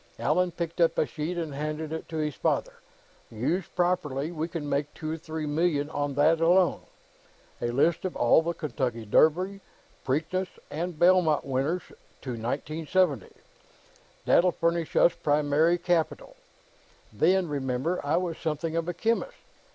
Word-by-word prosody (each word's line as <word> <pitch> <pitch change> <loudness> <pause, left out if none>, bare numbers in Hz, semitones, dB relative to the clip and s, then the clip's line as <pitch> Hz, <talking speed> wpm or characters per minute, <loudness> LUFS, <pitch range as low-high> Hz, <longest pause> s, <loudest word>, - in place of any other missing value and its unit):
Allan 180 0 +1
picked 170 0 -4
up 165 -1 +3
a - - +3
sheet 155 +4 -4
and 160 -4 -3
handed 155 +2 -4
it 160 - -6
to 160 - -4
his 150 -1 -1
father. - - -1 0.6
"Used 145 - -2
properly, 170 -5 0
we 160 -1 -3
can 165 -3 -5
make 145 +1 -1
two 155 0 -5
or 160 - -3
three 160 -1 -5
million 150 -1 0
on 145 -2 -2
that, 160 +3 +3
alone. 175 +2 +4 0.8
A - - 0
list 140 +7 +1
of 185 - -3
all 120 +6 +4
the 170 +1 -3
Kentucky 130 -8 -3
Derby, 180 - +3 0.4
Preakness, 160 +8 -1 0.2
and 170 +2 -4
Belmont 175 -3 +4
winners 140 +7 -1 0.4
to 130 - -4
1970. 145 - -1 1.0
That'll 180 +1 +4
furnish 170 -1 -1
us 170 - +5
primary 150 +3 +2
capital. 175 - -1 0.8
Then, 190 -1 +3
remember, 140 +4 -2
I 145 - +1
was 175 -2 -2
something 160 +1 -2
of 165 +1 -1
a 175 - -3
chemist. 230 - -1
160 Hz, 150 wpm, -27 LUFS, 145-175 Hz, 1.0 s, us